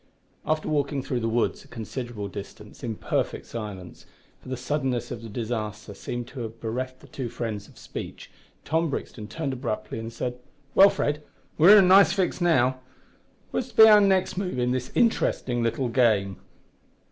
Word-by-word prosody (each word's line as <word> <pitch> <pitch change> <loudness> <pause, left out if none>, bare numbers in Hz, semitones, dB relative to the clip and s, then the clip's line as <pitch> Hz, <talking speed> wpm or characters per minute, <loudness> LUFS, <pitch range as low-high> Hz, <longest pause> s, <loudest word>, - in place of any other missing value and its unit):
After 155 0 0
walking 145 -2 0
through 125 - -2
the 115 -1 -1
woods 115 +1 0
a - - -19
considerable 115 -2 -6
distance 100 +1 -10
in 115 -3 -3
perfect - - -2
silence 100 -6 -8 0.3
for - - -13
the 130 - -3
suddenness 130 -2 -2
of 115 - -5
the 115 - -8
disaster 110 -2 -4
seemed 120 +4 -5
to 135 - -9
have 115 -1 -6
bereft 130 +3 -4
the - - -15
two 130 -4 -5
friends 110 -3 -5
of - - -19
speech - - -8 0.3
Tom 165 +1 +1
Brixton 110 -5 -5
turned 135 +6 -3
abruptly 110 -4 -4
and 115 +1 -6
said 125 +1 -4 0.3
"Well, 195 +1 +8
Fred, 145 -4 -1 0.3
we're 185 +7 +8
in 200 - +8
a - - +3
nice 195 +2 +7
fix 190 -2 -1
now. 130 -7 +3 0.7
What 255 - -1
is - - -15
to - - -26
be 220 - +10
our 210 -1 +8
next 190 -2 +2
move 185 -8 -2
in 125 0 +1
this 125 -1 -2
interesting 130 - +1
little 115 +3 0
game?" 110 -6 +2
125 Hz, 180 wpm, -26 LUFS, 115-150 Hz, 0.7 s, be